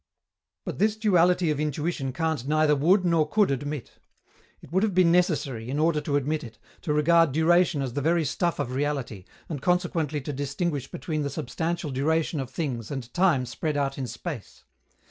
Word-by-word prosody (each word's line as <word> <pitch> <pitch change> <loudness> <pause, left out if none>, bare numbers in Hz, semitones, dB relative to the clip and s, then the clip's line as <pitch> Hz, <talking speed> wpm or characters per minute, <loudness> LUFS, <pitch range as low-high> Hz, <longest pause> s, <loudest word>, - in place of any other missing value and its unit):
But - - -5
this 215 +1 +3
duality 180 -5 +3
of 145 - -2
intuition 150 -2 -2
Kant 155 -1 -2
neither 155 0 +3
would 180 +7 +3
nor 165 -3 +2
could 210 -4 +3
admit. 145 0 -4 0.6
It - - -16
would 190 +2 +2
have 210 -4 0
been 180 -2 +5
necessary, 145 -10 +1
in 140 - -2
order 155 0 +2
to 145 -1 -2
admit 150 +2 0
it, 115 -2 -10 0.2
to 160 - -2
regard 165 +1 +4
duration 160 0 +3
as 130 -3 -4
the 145 - -2
very 165 +2 +2
stuff 170 +5 -1
of 125 - -3
reality, 130 -8 -3 0.2
and 145 -5 -5
consequently 170 -4 0
to 145 +2 -5
distinguish 145 +2 -2
between 155 +3 -3
the 140 - -1
substantial 160 +4 -3
duration 155 +4 0
of 130 -2 -4
things 130 -6 -4
and 130 -4 -6
time 175 -9 +3
spread 150 +4 -3
out 140 -1 -1
in 130 - -3
space. 120 - -7
150 Hz, 185 wpm, -26 LUFS, 135-170 Hz, 0.6 s, been